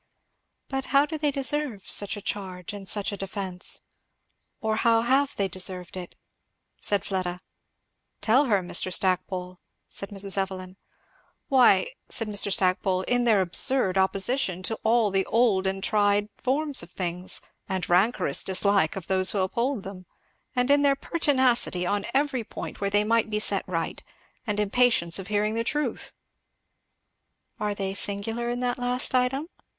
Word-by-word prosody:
"But 270 Hz, -1 st, -3 dB
how 275 Hz, +2 st, +3 dB
do 310 Hz, +2 st, -6 dB
they 295 Hz, -1 st, +1 dB
deserve 275 Hz, -6 st, -2 dB
such 205 Hz, 0 st, +1 dB
a 205 Hz, -, -9 dB
charge 185 Hz, -1 st, -5 dB
and 195 Hz, -2 st, -8 dB
such 205 Hz, -1 st, -1 dB
a 200 Hz, -, -5 dB
defence? 190 Hz, -2 st, -3 dB, 0.8 s
or 220 Hz, 0 st, -1 dB
how 230 Hz, 0 st, +3 dB
have 270 Hz, +3 st, +2 dB
they 200 Hz, -, 0 dB
deserved 185 Hz, -1 st, -2 dB
it?" 180 Hz, -2 st, -8 dB, 0.7 s
said 200 Hz, -1 st, 0 dB
Fleda. 185 Hz, -2 st, -2 dB, 0.8 s
"Tell 255 Hz, +6 st, +3 dB
her, 205 Hz, -7 st, +1 dB
Mr. 175 Hz, +1 st, +2 dB
Stackpole," 180 Hz, 0 st, -1 dB, 0.3 s
said 195 Hz, -, -6 dB
Mrs. 195 Hz, -1 st, -3 dB
Evelyn. 185 Hz, -1 st, -4 dB, 0.7 s
"Why," 270 Hz, -, +5 dB, 0.2 s
said 225 Hz, -, 0 dB
Mr. 205 Hz, -1 st, 0 dB
Stackpole, 185 Hz, 0 st, +1 dB
"in 245 Hz, +4 st, +1 dB
their 215 Hz, -4 st, +4 dB
absurd 190 Hz, +3 st, +3 dB
opposition 190 Hz, 0 st, +2 dB
to 220 Hz, +3 st, -3 dB
all 225 Hz, -2 st, +3 dB
the 195 Hz, 0 st, +2 dB
old 215 Hz, -5 st, +2 dB
and 195 Hz, 0 st, -3 dB
tried 205 Hz, -1 st, +2 dB
forms 285 Hz, +2 st, +1 dB
of 170 Hz, -, -9 dB
things, 180 Hz, 0 st, -1 dB, 0.3 s
and 185 Hz, -3 st, -2 dB
rancorous 195 Hz, +7 st, +3 dB
dislike 190 Hz, -3 st, +2 dB
of 190 Hz, -4 st, -6 dB
those 185 Hz, -1 st, +2 dB
who -, -, 0 dB
uphold 235 Hz, +4 st, -1 dB
them; 185 Hz, -2 st, -9 dB, 0.5 s
and 250 Hz, +2 st, +2 dB
in 285 Hz, 0 st, +5 dB
their 280 Hz, -1 st, +3 dB
pertinacity 260 Hz, -, +1 dB
on 200 Hz, +2 st, -1 dB
every 270 Hz, -3 st, 0 dB
point -, -, -8 dB
where 200 Hz, -, 0 dB
they 205 Hz, +1 st, +2 dB
might 225 Hz, +1 st, +1 dB
be 210 Hz, -1 st, 0 dB
set 200 Hz, -2 st, +1 dB
right, 165 Hz, -3 st, -3 dB, 0.5 s
and 210 Hz, -1 st, -1 dB
impatience 210 Hz, -5 st, +2 dB
of 190 Hz, -, -7 dB
hearing 210 Hz, 0 st, 0 dB
the 230 Hz, +1 st, -1 dB
truth." 295 Hz, +5 st, -2 dB, 1.5 s
"Are 210 Hz, -2 st, -2 dB
they 195 Hz, -1 st, -3 dB
singular 215 Hz, +4 st, -1 dB
in 245 Hz, +1 st, -3 dB
that 250 Hz, 0 st, -1 dB
last 250 Hz, +1 st, 0 dB
item?" 260 Hz, +4 st, +1 dB
205 Hz, 155 wpm, -26 LUFS, 190-245 Hz, 1.5 s, Why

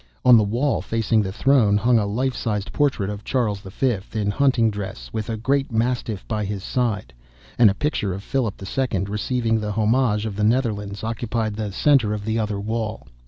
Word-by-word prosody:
On 125 Hz, -1 st, +9 dB
the 110 Hz, -, +5 dB
wall, 120 Hz, +8 st, 0 dB
facing 115 Hz, -1 st, +1 dB
the 95 Hz, -2 st, -3 dB
throne, 110 Hz, -2 st, +3 dB
hung 120 Hz, +2 st, +3 dB
a 105 Hz, -, -1 dB
life 125 Hz, +5 st, -1 dB
sized 105 Hz, -2 st, -3 dB
portrait 130 Hz, -9 st, +1 dB
of 105 Hz, 0 st, -7 dB
Charles 110 Hz, -7 st, 0 dB
V. 105 Hz, +5 st, -1 dB, 0.2 s
in 105 Hz, -2 st, 0 dB
hunting 125 Hz, -3 st, +2 dB
dress, 95 Hz, -13 st, -7 dB
with 110 Hz, +1 st, -3 dB
a 110 Hz, -, -2 dB
great 135 Hz, +4 st, 0 dB
mastiff 115 Hz, -3 st, -1 dB
by 110 Hz, -2 st, -1 dB
his 100 Hz, -1 st, -4 dB
side, 115 Hz, -5 st, -1 dB, 0.5 s
and 115 Hz, -3 st, +8 dB
a 95 Hz, -, -1 dB
picture 125 Hz, -9 st, -1 dB
of 95 Hz, +2 st, -5 dB
Philip 125 Hz, -6 st, -2 dB
II. 110 Hz, -2 st, -1 dB
receiving 115 Hz, +3 st, -1 dB
the 105 Hz, -1 st, -3 dB
homage 110 Hz, 0 st, +2 dB
of 105 Hz, -3 st, -4 dB
the 105 Hz, -, 0 dB
Netherlands 105 Hz, -4 st, 0 dB
occupied 110 Hz, -1 st, -2 dB
the 105 Hz, -1 st, -3 dB
centre 120 Hz, -1 st, +3 dB
of 105 Hz, -1 st, -6 dB
the 110 Hz, +1 st, 0 dB
other 105 Hz, -2 st, -2 dB
wall. 110 Hz, +1 st, -3 dB
110 Hz, 195 wpm, -22 LUFS, 105-120 Hz, 0.5 s, On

